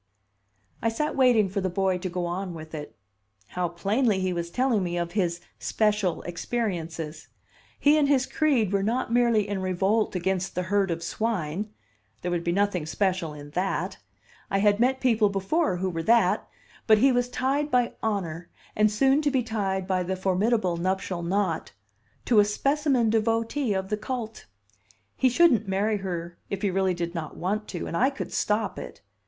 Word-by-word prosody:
I 230 - +2
sat 300 +7 -2
waiting 245 -6 +4
for 195 +1 -2
the 185 - 0
boy 185 0 0
to 185 - -3
go 175 0 -2
on 180 +1 -3
with 155 0 -10
it. 150 -6 -7 0.5
How 180 -1 -1
plainly 205 +5 +1
he 185 -1 0
was 170 -1 -3
telling 250 +1 +1
me 175 -1 -2
of 170 0 -2
his 175 -3 -1 0.2
"special 210 -5 0
experiences"! 170 -5 -4 0.5
He 295 +2 +5
and 290 - +3
his 270 -3 +3
creed 260 - +1
were 200 - +2
not 230 +3 -1
merely 235 -4 +3
in 200 -2 -2
revolt 190 +4 +1
against 190 +1 -1
the 180 - 0
herd 200 -2 +3
of 165 0 -3
swine; 205 -2 -2 0.5
there 180 - -1
would 175 -1 -1
be 170 - 0
nothing 190 -4 0
special 180 -3 -1
in 145 0 -10
that; 185 +5 -2 0.5
I 195 - +1
had 205 +1 +3
met 260 +2 +2
people 225 -5 +3
before 195 - 0
who 190 +1 -1
were 165 -1 -3
that; 230 +6 +3 0.4
but 215 -1 +7
he 265 +5 +5
was 245 0 +1
tied 275 +4 0
by 250 -3 +2
honor, 175 -6 -2 0.3
and 215 0 +4
soon 270 +7 +3
to 295 - +2
be 265 -3 +1
tied 195 -5 -2
by 185 -1 0
the 185 +1 -2
formidable 190 0 +1
nuptial 185 0 -2
knot, 190 +3 -1 0.5
to 230 -4 +4
a 205 - +6
specimen 275 +1 +1
devotee 225 +2 +1
of 190 0 -2
the 210 - 0
cult. 225 0 -5 0.7
He 260 - +3
shouldn't 250 - +4
marry 205 +3 +1
her 175 -3 -5
if 200 0 -4
he 200 - +2
really 190 -1 +1
did 170 0 -3
not 160 -3 -5
want 210 +4 -2
to, 175 - -5
and - - -4
I 255 +10 +3
could 275 - -6
stop 210 0 0
it! - - -10
200 Hz, 180 wpm, -26 LUFS, 180-230 Hz, 0.7 s, but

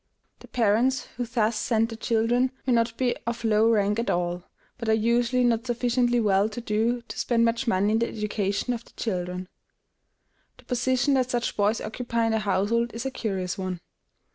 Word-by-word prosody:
The - - -14
parents 240 +3 +2
who 245 0 -3
thus 225 -1 +1
send 225 0 +1
their 225 - -6
children 235 +3 +1
may 255 - +2
not 230 0 +1
be 250 -2 +1
of 235 0 -3
low 220 0 +4
rank 210 -1 +2
at 235 - -1
all, 175 0 -1 0.4
but 230 -2 -3
are - - +5
usually 240 +3 +2
not 235 0 +1
sufficiently 245 0 +1
well 205 -1 +3
to 220 - -6
do 235 +2 0
to - - -7
spend 230 -1 +2
much 230 +2 0
money 200 0 +2
in 220 - +2
the 235 - +1
education 210 +2 -1
of 235 -1 -5
their - - -21
children. 180 -3 -3 1.1
The - - -19
position 255 +2 +1
that 255 -2 +2
such 240 -1 -1
boys 210 +2 +2
occupy 235 +1 -2
in 225 - +1
the 220 - +1
household 215 +4 0
is 230 - -5
a 270 - -1
curious 190 -7 -3
one. 185 -2 -3
230 Hz, 190 wpm, -26 LUFS, 210-240 Hz, 1.1 s, are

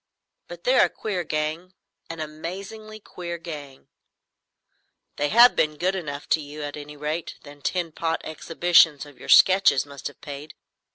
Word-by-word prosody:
But - - -10
they're - - +5
a - - -2
queer 190 -5 -3
gang,—an 165 +2 -5
amazingly 195 +8 -7
queer 175 -4 -7
gang!" 145 -5 -9 1.3
"They 145 0 0
have 235 +4 +7
been 155 -1 +1
good 185 +4 0
enough 145 -6 -5
to 160 - +3
you, 150 +1 -8
at 145 0 -5
any 150 0 -9
rate. 155 +3 -4
That 145 -1 -14
tin 175 -3 -1
pot 165 +1 -2
exhibition 165 0 +3
of 145 - -17
your - - -11
sketches 185 -8 +6
must 140 -2 -7
have 145 - -12
paid. 145 +1 -9
160 Hz, 155 wpm, -24 LUFS, 145-180 Hz, 1.3 s, have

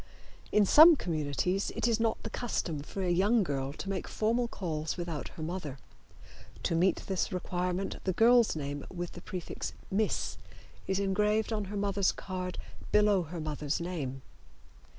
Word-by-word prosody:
In 210 -1 +5
some 315 - +9
communities 170 - -1
it - - +1
is 230 -1 +2
not 225 -1 0
the 225 - -5
custom 175 -11 -2
for 190 +6 -5
a 180 - +1
young 205 +5 +3
girl 135 -4 -2
to 175 - -7
make 195 -2 -3
formal 235 +3 +1
calls 160 -7 -3
without 170 -4 -4
her 160 - -8
mother. 155 -5 -4 0.9
To - - 0
meet 175 +2 +2
this 190 -2 -1
requirement 180 +1 -2
the 185 - +1
girl's 235 +2 +5
name 145 -1 -4
with 175 -1 -4
the 175 - -10
prefix 180 -1 -5 0.2
"Miss" 210 +2 0 0.5
is 190 - +1
engraved 210 +3 +1
on 210 -2 -1
her 205 +2 -5
mother's 200 -1 +2
card, 185 -1 -5 0.3
below 210 -2 +4
her 170 +1 -6
mother's 150 -1 -2
name. 145 -7 -4
185 Hz, 160 wpm, -31 LUFS, 165-210 Hz, 0.9 s, some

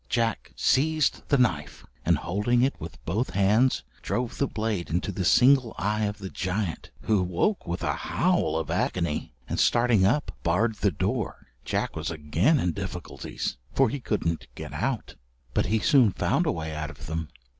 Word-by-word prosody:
Jack 115 -2 0
seized 155 +3 +2
the 140 - +4
knife, 85 - 0 0.2
and - - +3
holding 105 +7 +1
it 135 - +2
with 80 -1 -8
both 105 +10 0
his 90 - -10
hands 105 - +3 0.2
drove 120 -1 -2
the 140 - +2
blade 105 -7 -2
into 90 +4 -1
the 95 0 -3
single 125 +6 +5
eye 105 +5 0
of 105 0 -3
the 95 -2 -7
giant, 90 -1 -3
who 105 -3 +2
woke 90 - 0
with 85 +1 -3
a - - +1
howl - - +1
of 80 -2 -3
agony, 85 -8 -1
and - - -2
starting 120 -4 +4
up, 125 +10 +2
barred 100 +7 +2
the 100 - +2
door. 80 - -2 0.2
Jack - - -1
was - - -3
again 85 - +2
in 90 - +1
difficulties, 95 -2 -5 0.2
for 135 -3 +4
he 140 - -3
couldn't 85 -9 -2
get - - -7
out, - - -2 0.4
but - - +1
he 110 - +2
soon 120 0 +5
found - - +1
a - - +3
way 80 -1 -4
out 75 0 -4
of - - -10
them. 80 0 -4
100 Hz, 180 wpm, -26 LUFS, 85-120 Hz, 0.4 s, single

